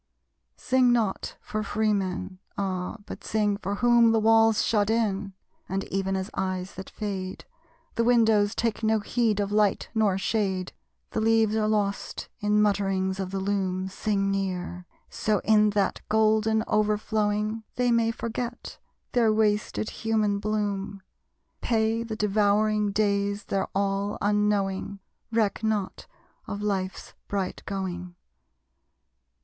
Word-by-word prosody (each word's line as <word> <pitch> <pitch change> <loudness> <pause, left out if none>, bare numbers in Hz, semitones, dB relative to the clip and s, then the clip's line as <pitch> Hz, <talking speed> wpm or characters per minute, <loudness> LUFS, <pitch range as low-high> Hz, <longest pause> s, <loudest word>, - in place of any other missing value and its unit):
Sing 255 -1 +3
not 225 -5 0
for 215 - -3
free 215 0 0
men. 185 -1 -3 0.2
Ah, 185 0 -2
but - - -9
sing 210 -2 +1
for 200 0 -3
whom 235 +1 +5
The 225 - +3
walls 225 0 +4
shut 210 -2 +2
in; 205 -3 0 0.4
and 195 +1 -1
even 195 0 0
as 190 +2 -3
eyes 185 0 -3
that 190 0 -8
fade, 190 -3 -5 0.5
The 230 - +1
windows 225 -3 +4
take 225 -1 -1
no 220 0 +2
heed 220 0 0
of 200 0 -1
light 210 -1 +2
nor 215 -4 +2
shade, 190 -3 -1 0.4
The 220 - -1
leaves 220 -1 +3
are 215 -1 +1
lost 205 -2 -1
in 210 0 +3
mutterings 195 -2 0
of 190 -1 -2
the 195 0 -3
loom. 190 -1 -1
Sing 195 0 0
near! 180 -2 -3 0.2
So 210 -2 0
in 215 -1 +5
that 200 - +1
golden 220 0 +3
overflowing 210 0 0
They 245 -1 +2
may 230 -1 +3
forget 235 +1 -5 0.3
their 230 -3 +3
wasted 215 0 0
human 215 -2 0
bloom; 200 -2 -2 0.6
Pay 225 0 +1
the 230 -1 -4
devouring 210 0 +2
days 200 0 0
their 195 -1 -1
all, 200 +1 0
unknowing. 205 -1 0 0.3
Reck 225 -1 +1
not 215 -3 -2 0.4
of 205 0 -4
life's 190 -2 -3
bright 195 -2 -3
going! 180 -2 -4
210 Hz, 135 wpm, -26 LUFS, 195-220 Hz, 0.6 s, whom